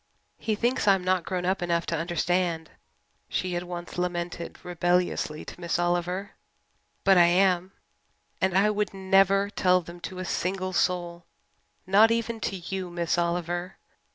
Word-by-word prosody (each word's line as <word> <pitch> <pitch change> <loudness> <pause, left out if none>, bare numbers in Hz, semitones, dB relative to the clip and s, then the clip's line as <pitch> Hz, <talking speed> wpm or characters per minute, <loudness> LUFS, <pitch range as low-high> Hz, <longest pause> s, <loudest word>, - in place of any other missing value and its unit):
"He 220 - -1
thinks 240 0 0
I'm 195 -2 +4
not 185 -2 +1
grown 180 -1 -2
up 190 +1 0
enough 170 -1 0
to 165 - -1
understand," 170 0 -1 0.6
she 185 -1 -2
had 175 - -1
once 175 0 -6
lamented 175 -1 -3
rebelliously 175 -3 0
to - - -10
Miss 170 -1 -1
Oliver, 175 +3 -1 0.7
"but 195 -2 +6
I 170 - +7
am! 185 +1 +2 0.7
And 190 0 +2
I 210 +2 +4
would 210 -1 -2
never 195 +1 +3
tell 180 -2 +3
them 170 0 -10
to 185 +1 -7
a 185 - -4
single 185 +2 -2
soul 175 -1 -1 0.6
not 205 +4 +6
even 230 0 -1
to 200 - -2
you, 185 +1 -5
Miss 175 -1 -1
Oliver. 175 +1 -2
180 Hz, 155 wpm, -27 LUFS, 175-195 Hz, 0.7 s, I